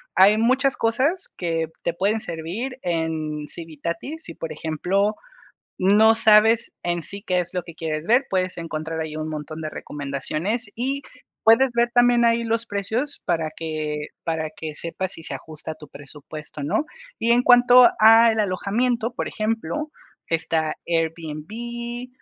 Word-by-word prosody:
hay 205 +3 +6
muchas 260 +4 +2
cosas 275 +11 +1
que 165 -2 -1 0.2
te 170 - 0
pueden 205 +5 0
servir 180 +11 -5
en 160 -3 -2
Civitatis, 170 - -5
si, - - -8
por 160 -1 -6
ejemplo, 180 +7 0 0.6
no 210 +4 +5
sabes 220 +1 +5
en 175 -1 -1
sí, 200 +1 -6
qué 180 -1 +1
es 175 +1 -4
lo 180 - -1
que 170 - -12
quieres 155 -1 -3
ver, 245 +4 +4
puedes 185 -1 -1
encontrar 160 -1 -4
ahí 155 -1 -5
un 155 0 -4
montón 155 +1 -6
de 155 - -3
recomendaciones 155 - -3
y 270 +4 +1 0.4
puedes 240 +4 +6
ver 235 0 +3
también 245 -1 +5
ahí 235 0 +3
los 230 0 -1
precios 220 +8 -3
para 165 -3 0
que 155 -2 -4 0.2
para 160 -2 -2
que 155 -2 -6
sepas 180 +4 -4
si 165 - -10
se - - -3
ajusta 155 +3 -7
a - - -8
tu 155 -1 -13
presupuesto 150 +1 -10
o - - -4
no, 220 - 0 0.3
y 230 +1 +3
en 245 +1 +5
cuanto 245 0 +8
al 225 +1 +7
alojamiento, 220 +5 0
por - - -3
ejemplo, 225 - -2 0.4
está 160 -1 0
Airbnb 195 +10 -3
185 Hz, 155 wpm, -23 LUFS, 160-230 Hz, 0.6 s, cuanto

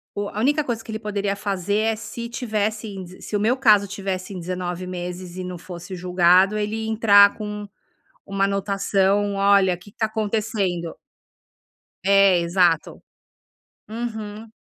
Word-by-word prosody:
o 205 0 -3
a 210 - -6
única 290 +5 +2
coisa 230 -4 -3
que - - -18
ele 220 - -3
poderia 205 -2 -2
fazer, 200 -1 -2 0.2
é - - -4
se 225 +2 -7
tivesse 220 -2 -2
em 195 -2 -7
d 180 +1 -14
se 210 - -5
o - - +1
meu 230 +5 +2
caso 210 -6 +5
tivesse 195 -1 -4
em 185 - -6
19 180 +1 -4
meses 180 0 -6
e 185 - -4
não 180 -1 -6
fosse 180 +1 -8
julgado, 180 +3 +4
ele 210 +1 -2
ia - - -3
entrar 205 -2 +6
com 210 -1 -6 0.6
uma 195 0 0
anotação: 200 0 +1
"Olha, 195 -2 +4
o - - -10
que 205 +3 -15
está 220 +2 -1
acontecendo?". 210 -6 -2 1.1
É, 195 -2 +5
exato. 170 -1 +1 0.9
Uhum. 220 -1 -6
200 Hz, 160 wpm, -23 LUFS, 185-215 Hz, 1.1 s, entrar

